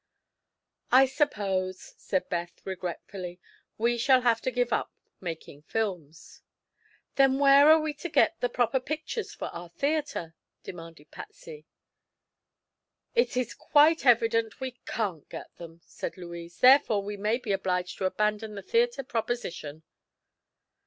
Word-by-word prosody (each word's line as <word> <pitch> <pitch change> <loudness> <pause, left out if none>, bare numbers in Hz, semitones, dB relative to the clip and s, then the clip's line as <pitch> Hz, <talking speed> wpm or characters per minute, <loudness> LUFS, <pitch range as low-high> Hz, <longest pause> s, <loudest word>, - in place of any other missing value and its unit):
"I 265 +2 +7
suppose," 195 -9 -2
said 185 -2 -2
Beth 170 -1 -4
regretfully, 180 0 -6 0.4
"we 235 +2 +1
shall 260 +1 +4
have 235 -2 +2
to - - -1
give 245 -2 0
up - - -1 0.3
making 165 -5 -7
films." 175 -5 -5 0.8
"Then 270 -1 +5
where 280 +1 +7
are 315 0 +8
we 310 -1 -2
to 330 +4 -7
get 330 +1 +3
the 245 - +1
proper 245 +2 +1
pictures 310 - -5
for - - -5
our 170 0 -9
theatre?" 285 - -2 0.3
demanded 165 -3 -11
Patsy. 155 -1 -11 1.5
"It 475 - +1
is 250 -2 -1
quite 310 +2 +4
evident 230 -3 +3
we 260 -1 -4 0.2
can't 190 -9 -3
get - - -9
them," 170 -1 -11
said - - -6
Louise. 170 -1 -9
"Therefore 250 -6 +6
we 205 +1 -5
may 210 +3 0
be 240 -5 -5
obliged 185 -2 -1
to 190 - -1
abandon 210 +2 -1
the 200 - -7
theatre 475 - +1
proposition." 225 - -4
220 Hz, 135 wpm, -28 LUFS, 180-265 Hz, 1.5 s, are